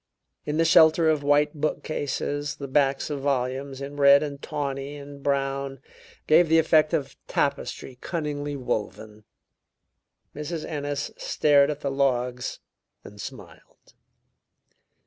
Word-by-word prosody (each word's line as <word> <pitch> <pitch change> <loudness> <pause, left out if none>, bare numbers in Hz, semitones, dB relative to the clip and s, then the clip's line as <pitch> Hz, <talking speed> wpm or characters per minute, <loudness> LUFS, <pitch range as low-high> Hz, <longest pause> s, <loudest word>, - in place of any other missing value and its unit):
In 150 +1 -1
the 165 - +3
shelter 160 0 +6
of 155 -2 0
white 145 +1 +3
bookcases, 145 -1 -2
the 140 - -7
backs 135 +1 +1
of 145 - -3
volumes 135 0 -2
in 140 +1 -7
red 140 0 +6
and 140 -1 -6
tawny 140 0 -4
and 140 0 -10
brown 135 -1 -1 0.5
gave 160 +1 +5
the 165 - +5
effect 155 -1 +4
of 135 -2 -2
tapestry 140 -2 -2
cunningly 145 -3 -3
woven. 110 -4 -4 1.1
Mrs. 155 +2 -4
Ennis 145 -2 -3
stared 145 -1 +3
at 150 0 -4
the 140 - -2
logs 125 -2 -1 0.4
and 105 0 -11
smiled. - - -12
140 Hz, 125 wpm, -25 LUFS, 135-150 Hz, 1.1 s, shelter